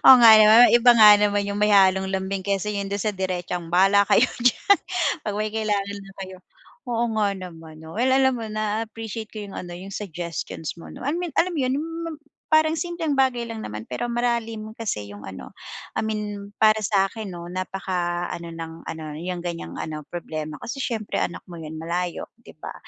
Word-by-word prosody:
Oo, 265 - +12
nga 225 -1 +10
naman 220 +3 +8
iba 240 +1 +7
nga 220 -2 +9
naman 205 0 +2
yung 200 0 -3
may 210 0 +3
halong 190 -1 +4
lambing 190 0 -2
kaysa 200 +1 0
yung 200 -1 -3
do'n 200 0 -2
sa 215 - +1
diretsang, 180 -2 -3
"Bahala 195 +3 +4
kayo 235 - +5 0.2
diyan, 250 - +4 0.5
'pag 210 - -1
may 215 0 -1
kailangan 205 -2 -1
na 195 - -13
kayo" 190 -1 -9 0.5
Oo 235 -1 0
nga 210 -1 +3
naman 165 -4 -10
'no? 160 +6 -9
Well, 250 +2 +2
alam 265 0 +4
mo 225 - -5
naa-appreciate 215 0 -4
ko 215 -2 -7
yung 200 - -9
ano 175 -1 -7
yung 195 +2 -9
suggestions 170 -4 -5
mo - - -11
'no, - - -10
I 285 - 0
mean 345 -1 -3
alam 365 +2 +2
'yon 260 -1 +1
hmm, 325 +3 -4
ma - - -4 0.4
parang 315 +1 +3
simpleng 345 -3 -2
bagay 260 -3 +2
lang 230 -1 -6
naman 105 - -6
pero 125 - -4
malalim 235 -2 -2
kasi 215 - -4
yung 100 - -10
ano. 95 -1 -9 0.4
I - - -1
mean 210 -2 -4
para 215 0 +4
sa'kin 200 +1 0
'no, 175 -2 -8
napaka 180 -2 -2
ano 170 0 -6
ng 165 0 -8
ano 160 -1 -6 0.2
yung 180 0 -4
ganiyang 170 -1 -5
ano 155 -1 -5
problema 155 -3 -5
kasi 275 +4 -6
siyempre 225 -5 -2
anak 175 - -3
mo 170 -2 -10
yan, 160 0 -7
malayo 170 +2 -3 0.2
'di - - -16
ba? - - -7
200 Hz, 195 wpm, -24 LUFS, 175-225 Hz, 0.5 s, Oo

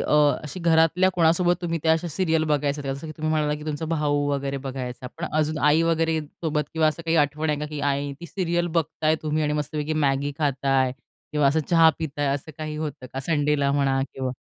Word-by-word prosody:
अ, - - -1 0.3
अशी 150 +4 -7
घरातल्या 165 +2 +4
कोणासोबत 175 +1 +3
तुम्ही 165 -1 -1
त्या 160 - +4
अशा 165 +2 0
सीरियल 160 -1 +1
बघायचात 145 0 0
जसं 135 +3 -4
की 155 - -6
तुम्ही 155 0 -2
म्हणालात 150 -1 +1
की 150 - -9
तुमचा 155 +1 -3
भाऊ 145 -2 +1
वगैरे 140 -1 -2
बघायचा, 130 -1 -5
पण 170 - -3
अजून 155 0 0
आई 160 +2 +4
वगैरे 165 -1 +1
सोबत 150 0 -3
किंवा 160 -1 +3
असं 155 +2 -4
काही 165 0 +2
आठवण 150 +1 +1
आहे 150 - -1
का? 150 - -3
की 150 -1 -6
आई 140 0 -1
ती 170 - -7
सीरियल 175 -2 -1
बघताय 155 0 0
तुम्ही 155 0 0
आणि 150 - 0
मस्तपैकी 150 +1 -2
Maggi 140 +1 +1
खाताय 135 -3 +1 0.4
किंवा 150 -2 +3
असं 155 +3 +3
चहा 165 -2 +7
पिताय 145 -2 -2
असं 145 +2 -6
काही 155 -1 -4
होतं 150 -4 -5
का 135 - -3
संडेला 145 -1 +1
म्हणा 135 -1 +2
किंवा 130 -1 -2
150 Hz, 210 wpm, -24 LUFS, 145-160 Hz, 0.4 s, चहा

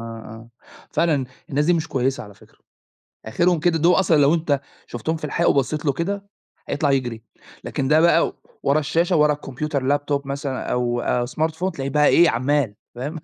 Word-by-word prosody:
آه. 115 0 -9 0.4
فعلًا 150 -6 +1 0.3
الناس 145 +2 +1
دي 175 - +3
مش 165 -2 -1
كويسة 130 0 -1
على 105 -1 -12
فكرة. - - -22 0.7
آخرهم 170 +8 +1
كده 165 0 +2
دُول 170 +3 +4
أصلًا 165 -4 +3
لو 145 +2 +4
أنت 155 -4 0 0.3
شُفتهم 160 +7 -3
في 155 - -8
الحقيقة 170 +3 +1
وبصّيت 145 +3 0
له 140 - +2
كده، 200 +6 -3 0.4
هيطلع 145 -1 0
يجري. 120 -4 -1 0.4
لكن 135 -1 -2
ده 155 +1 +5
بقى 170 0 +4 0.3
ورا 140 +2 +2
الشاشة، 165 +4 +1
وورا 150 0 +4
الكمبيوتر، 145 0 -4 0.2
الLaptop 145 -1 -3
مثلًا 140 -1 -4
أو 120 -1 0
آآ 120 0 0
Smartphone، 160 +6 -2
تلاقيه 135 -4 -5
بقى 150 +1 +3
إيه، 170 -1 +5
عَمّال، 130 -2 0 0.2
فاهم؟ 145 +7 -5
145 Hz, 175 wpm, -22 LUFS, 130-160 Hz, 0.7 s, ده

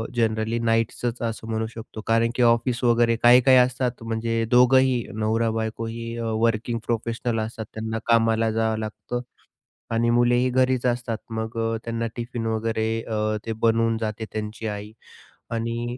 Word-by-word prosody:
Generally 110 0 0
नाईटचचं 115 +1 0
असं 110 0 -7
म्हणू 110 0 -1
शकतो, 110 -1 -8
कारण 115 +1 +3
की - - 0
ऑफिस 120 +1 +2
वगैरे, 120 -1 +4
काही-काही 125 +2 +7
असतात, 125 -1 +1
म्हणजे 115 0 -1
दोघंही 125 0 +5
नवरा-बायकोही 115 +1 -2
वर्किंग 115 0 0
प्रोफेशनल 115 0 -1
असतात. 110 -1 -7
त्यांना 110 0 -3
कामाला 115 -1 +3
जावं 110 0 0
लागतं 110 +3 -5 0.7
आणि 115 +1 +2
मुलेही 120 +1 +3
घरीचं 130 0 +2
असतात. 120 -2 -4
मग 110 +1 -4
अ, 115 0 0
त्यांना 115 0 -2
टिफिन 120 -1 -4
वगैरे 110 0 -1
अ, 110 -1 -1
ते 115 - -1
बनवून 115 0 +3
जाते 110 0 -3
त्यांची 110 +1 -5
आई. 105 +1 -6 0.6
आणि 115 +1 -3
115 Hz, 140 wpm, -24 LUFS, 110-120 Hz, 0.7 s, काही-काही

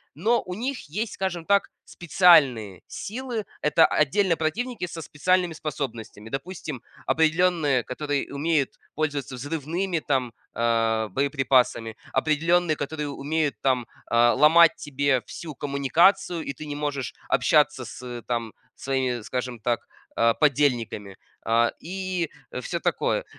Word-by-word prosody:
Но 225 +9 +2
у 180 - -7
них 255 +3 -3
есть, 210 +7 -3
скажем 175 -3 -3
так, 200 0 +3 0.2
специальные 140 - +4
силы. 235 -1 -5 0.2
Это 150 +2 +5
отдельно 165 +4 +2
противники 210 +7 -2
со 165 0 -7
специальными 180 +3 +1
способностями. 120 -8 -6
Допустим, 140 -2 -5 0.2
определённые, 160 -5 +2
которые 145 +2 -3
умеют 145 -1 0 0.2
пользоваться 145 -4 -2
взрывными 165 +6 -2
там, 130 -6 -1 0.2
а, 115 -1 +1
боеприпасами. 130 -3 +1 0.2
Определенные, 165 +1 +2
которые 150 +1 -4
умеют 145 -1 -1
там, 130 -3 +1 0.2
а, 120 0 +4
ломать 160 +4 +6
тебе 140 -3 0
всю 160 -3 -7
коммуникацию, 165 +6 +2
и 140 - -4
ты 155 - -9
не 145 -1 -5
можешь 145 -3 -3 0.2
общаться - - +3
с, - - -9
ы, 120 -2 -7
там 115 -2 -3 0.2
своими, 130 -3 -1
скажем 125 +1 -4
так, 120 +2 -1 0.3
а, 115 0 +4
подельниками. 120 -9 0 0.3
А, 115 +1 +3
и 185 -1 -3 0.3
всё - - -3
такое. - - 0
145 Hz, 125 wpm, -25 LUFS, 125-170 Hz, 0.3 s, ломать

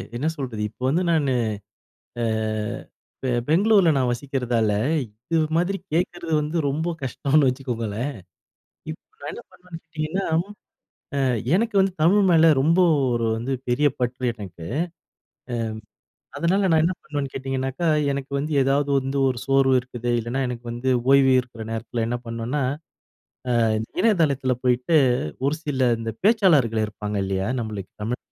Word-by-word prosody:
என்ன 135 +6 -1
சொல்றது. 125 -6 -4
இப்ப 120 - -29
வந்து 170 +7 +1
நானு 145 -5 +2 0.9
ஆ - - +1 1.0
பெ 130 - -2 0.2
பெங்களூர்ல 195 +1 +5
நான் 130 -2 +2
வசிக்கிறதால 120 -4 -1 0.3
இது 115 +9 -5 0.2
மாதிரி 180 +3 +1 0.2
கேட்கிறது 175 -1 -1
வந்து 150 +3 -3
ரொம்ப 160 +5 -1
கஷ்டம்னு 140 +2 +2
வச்சுக்கோங்களேன். 125 -1 -3 0.8
இப்ப 155 - -8 0.2
நான் - - -5
என்ன - - -8
பண்ணுவேன்னு 180 -2 -11
கேட்டிங்கன்னா, 160 +4 -3 0.9
ஆ - - +1 0.4
எனக்கு 225 +1 0
வந்து 190 -1 +1
தமிழ் 200 +5 +5
மேல 165 -1 +6
ரொம்ப 165 +5 +3 0.4
ஒரு 115 -1 0
வந்து 125 +4 -2 0.2
பெரிய 145 +4 +3
பற்று 125 0 -1
எனக்கு. 90 -7 -9 1.7
ஆ - - -7
அதனால 190 +3 +2
நான் 160 -1 +4
என்ன 180 +3 +1
பண்ணுவேன்னு 145 -3 -4
கேட்டிங்கனாக்கா, 135 +4 -2 0.3
எனக்கு 140 0 -5
வந்து 150 +2 -3
ஏதாவது 140 +2 +1
வந்து 135 +1 -3
ஒரு 125 -2 -3
சோர்வு 135 -1 +3
இருக்குது 120 -1 -4
இல்லைனா 120 +4 -2
எனக்கு 120 -1 -6
வந்து 120 +2 -2 0.2
ஓய்வு 135 -1 +6
இருக்கிற 120 -3 -10
நேரத்தில 115 0 -3
என்ன 120 0 -2
பண்ணுவேனா, 115 +5 -2 1.4
இணையதளத்தில 145 - +2
போயிட்டு 125 +6 +3 0.5
ஒரு 155 +3 0
சில 130 -4 +1
இந்த 115 -1 -4
பேச்சாளர்கள் 155 - +4
இருப்பாங்க 105 -1 -5
இல்லையா? 95 +2 -1
நம்மளுக்கு 105 -4 -6
தமிழ் 120 +3 -2
135 Hz, 135 wpm, -23 LUFS, 120-160 Hz, 1.7 s, மேல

